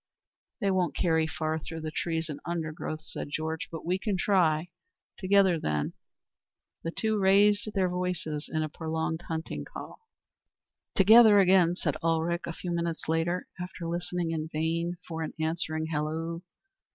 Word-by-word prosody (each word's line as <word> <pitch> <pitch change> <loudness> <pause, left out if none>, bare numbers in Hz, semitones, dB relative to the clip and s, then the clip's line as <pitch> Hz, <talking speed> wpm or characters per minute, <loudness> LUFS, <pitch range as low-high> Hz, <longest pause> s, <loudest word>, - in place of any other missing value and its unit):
"They 195 - +2
won't 180 -3 +1
carry 160 -2 +2
far 160 0 -2
through 160 +1 -7
the 155 0 -4
trees 165 0 -1
and 150 -3 -6
undergrowth," 155 -2 -4
said 160 - -6
Georg, 160 +2 -2
"but 165 - -7
we 180 +2 0
can 200 -1 -1
try. 175 -4 +2 0.5
Together, 190 -3 +4
then." 75 - -1 0.9
The 165 - -2
two 220 +4 0
raised 205 +2 +4
their 190 -2 +3
voices 180 -4 -3
in 155 -1 0
a - - -1
prolonged 160 +1 -3
hunting 160 0 -4
call. - - -9 1.0
"Together 215 +1 +8
again," 180 -2 +5
said 150 -5 -1
Ulrich 165 +1 +1
a 170 - -3
few 175 +1 -5
minutes 170 -1 -2
later, 165 +3 0
after 180 -1 -6
listening 175 0 -2
in 160 -1 -3
vain 165 +2 -1
for 165 -1 -4
an 160 - -4
answering 160 0 -1
halloo. 160 +2 -2
165 Hz, 150 wpm, -29 LUFS, 160-180 Hz, 1.0 s, Together